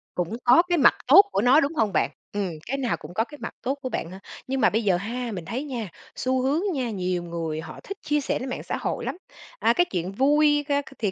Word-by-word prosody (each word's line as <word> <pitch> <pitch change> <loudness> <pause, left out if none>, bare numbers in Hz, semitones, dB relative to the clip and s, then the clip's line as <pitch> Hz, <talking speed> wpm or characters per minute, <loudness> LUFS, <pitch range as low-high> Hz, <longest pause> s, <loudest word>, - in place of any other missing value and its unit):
Cũng 180 +5 -2
có 250 +7 +7
cái 350 - +3
mặt 280 - +6
tốt 340 +10 +10
của 200 - +1
nó, 255 +6 +6
đúng 290 +1 0
hông 220 -8 +1
bạn? 155 - +2 0.2
Ừm, 200 -3 -1
cái 275 +2 -2
nào 255 -3 -1
cũng - - -11
có 220 - +1
cái 295 +5 -12
mặt - - -5
tốt 265 +3 0
của 255 - -3
bạn 165 - -4
hả? 190 - -9 0.3
Nhưng 265 0 -1
mà - - +5
bây 225 +2 0
giờ 190 -4 +3
ha, 235 +5 -4
mình 180 -5 -6
thấy 255 +5 -3
nha, 240 -9 -5 0.3
xu 260 0 0
hướng 280 +6 +1
nha, 255 -5 -2
nhiều 180 -3 -2
người 165 -2 -4
họ - - -9
thích 395 - -7
chia 295 0 0
sẻ - - -1
lên 260 +1 -5
mạng - - -5
xã - - -3
hội - - -3
lắm. - - -3 0.4
À, 230 - +4
cái 350 +7 +3
chuyện 180 0 -2
vui 295 +5 +3
ca 285 0 +1
c - - -20
thì 210 -4 0
245 Hz, 270 wpm, -25 LUFS, 195-280 Hz, 0.4 s, tốt